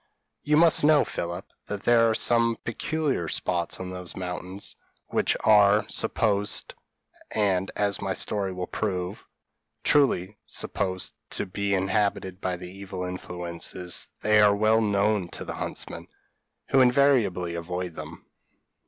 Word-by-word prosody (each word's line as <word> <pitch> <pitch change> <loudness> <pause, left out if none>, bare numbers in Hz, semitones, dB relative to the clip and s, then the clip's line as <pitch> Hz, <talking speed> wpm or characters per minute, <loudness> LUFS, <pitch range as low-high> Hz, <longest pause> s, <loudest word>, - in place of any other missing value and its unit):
p> - - -12
"You 150 - +5
must 165 -1 +6
know, 150 0 +5
Philip, 85 0 -5 0.2
that 105 -1 -5
there 115 -1 +5
are 110 - +1 0.5
peculiar 135 - -2
spots 85 +2 -1
on 95 0 -5
those 90 -1 -6
mountains 90 +1 -5 0.3
which - - +1
are 105 0 +5
supposed, 105 -2 0 0.6
and, 95 -3 0
as 100 -1 0
my 100 -1 -2
story 100 +1 0
will 90 0 -4
prove, 95 -1 -4 0.6
truly 105 -9 +2
supposed, 95 -2 -1 0.2
to - - +1
be 100 +1 -1
inhabited 95 -1 -1
by 90 -1 -2
the 90 0 -8
evil 95 -1 -6
influences: 90 -1 -4
they 105 0 +5
are 105 -1 +5
well 110 +2 +3
known 100 -2 +1
to - - -5
the - - -5
huntsmen, - - -6 0.6
who 135 - +5
invariably 125 -10 +3
avoid 90 +1 -4
them. - - -9
100 Hz, 135 wpm, -26 LUFS, 90-110 Hz, 0.6 s, must